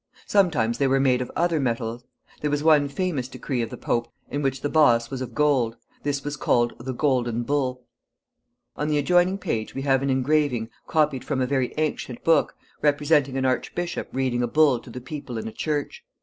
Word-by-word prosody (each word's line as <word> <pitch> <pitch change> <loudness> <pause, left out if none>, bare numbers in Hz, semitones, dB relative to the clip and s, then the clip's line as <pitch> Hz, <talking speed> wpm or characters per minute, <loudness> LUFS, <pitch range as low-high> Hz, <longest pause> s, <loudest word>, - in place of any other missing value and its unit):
Sometimes 160 - +2
they 140 - +3
were 135 +1 +3
made 130 -2 +3
of 125 - -4
other 170 -2 +1
metals. 120 -2 -2 0.4
There 150 - -1
was 145 0 -1
one 150 -3 +5
famous 145 -4 -2
decree 130 -1 -3
of 115 - -3
the - - -8
Pope 115 0 -1 0.2
in 145 - -1
which 135 -1 -1
the - - 0
boss 120 -6 +3
was 130 -1 -4
of 125 -2 -6
gold. 135 -6 +2 0.3
This 140 -1 -2
was 145 0 -3
called 120 -2 +2
the 130 +3 -4
golden 120 -3 0
bull. 130 -2 -1 0.9
On 150 - -2
the 150 -1 +1
adjoining 180 +5 +3
page 110 - -3
we 135 - -3
have 135 -2 +3
an 140 - -1
engraving, 130 -3 +1 0.2
copied 150 -4 +1
from 140 -3 -2
a 130 - +2
very 130 -1 0
ancient 150 -5 -2
book, 165 - +3 0.3
representing 145 -2 +2
an 130 - 0
archbishop 170 +7 -2
reading 130 -2 0
a 120 - +1
bull 145 -1 +4
to - - -14
the 125 - -7
people 130 -2 -6
in 110 - -4
a - - -5
church. 150 -2 -3
135 Hz, 200 wpm, -24 LUFS, 125-150 Hz, 0.9 s, one